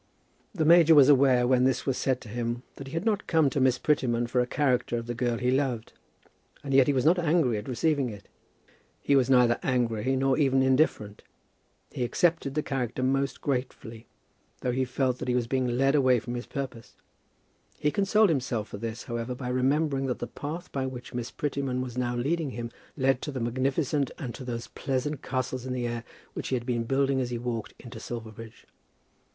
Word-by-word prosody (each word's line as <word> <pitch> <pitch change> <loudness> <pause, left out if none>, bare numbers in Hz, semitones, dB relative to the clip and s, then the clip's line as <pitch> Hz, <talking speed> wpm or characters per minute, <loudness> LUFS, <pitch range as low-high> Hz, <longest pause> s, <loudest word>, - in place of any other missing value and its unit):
The 160 -4 +1
major 165 0 +7
was 145 -1 +7
aware 130 -3 +5
when 125 0 +3
this 130 -1 +1
was 135 - 0
said 130 -1 0
to - - -11
him 120 +2 -3
that 140 - -8
he 135 - -10
had 165 +5 -2
not 215 -3 0
come 160 -5 +3
to 140 - -1
Miss 130 -1 +3
Prettyman 125 -4 +1
for 125 +1 +1
a 125 - -1
character 125 -4 0
of 115 - -4
the 120 - -3
girl 120 0 -1
he 125 +1 0
loved; 130 -4 -1 0.7
and 140 -1 -3
yet 135 -1 +6
he - - +4
was 130 -2 0
not 175 +3 +5
angry 155 -9 +2
at 105 - -10
receiving 135 +1 0
it. 100 -2 -10 0.7
He 140 - +2
was 130 -1 +3
neither 125 -2 +4
angry, 125 -1 0
nor 135 +1 +1
even 135 -2 +3
indifferent. 130 -6 +1 0.7
He 125 - -3
accepted 150 +1 +1
the 150 - 0
character 130 -2 -2
almost 135 +1 0
gratefully, 125 -4 -4 0.5
though 125 - 0
he 130 +1 0
felt 130 0 -1
that 130 - -5
he 125 - +1
was 125 -2 +1
being 130 +1 0
led 135 +3 +2
away 130 -4 +4
from 120 +2 -6
his 120 0 -5
purpose. 130 -5 -6 0.8
He 150 0 0
consoled 205 +3 +3
himself 125 -7 -1
for - - -7
this, 115 +3 -5
however, 120 +1 -4
by 125 -1 -5
remembering 135 +2 +1
that 125 - -2
the - - -4
path 160 +5 -7
by 135 -1 -2
which 125 -1 -8
Miss 120 0 -4
Prettyman 135 -2 -2
was 125 -2 -4
now 120 -1 -1
leading 150 +5 -1
him, 120 -2 -6 0.3
led 135 -1 +2
to 150 - -4
the 135 - -4
magnificent, 135 +4 0
and 130 -8 -5
to - - -8
those 120 -2 -4
pleasant 135 +1 -3
castles 130 -1 -3
in 130 - -2
the 125 -1 -2
air 120 0 -3 0.3
which - - -5
he 130 - 0
had 120 -1 -3
been 120 -2 -1
building 135 +1 +1
as 125 - -2
he 120 - -3
walked 115 -2 -4
into 120 -2 -10
Silverbridge. 110 -1 -8
130 Hz, 205 wpm, -27 LUFS, 120-140 Hz, 0.8 s, major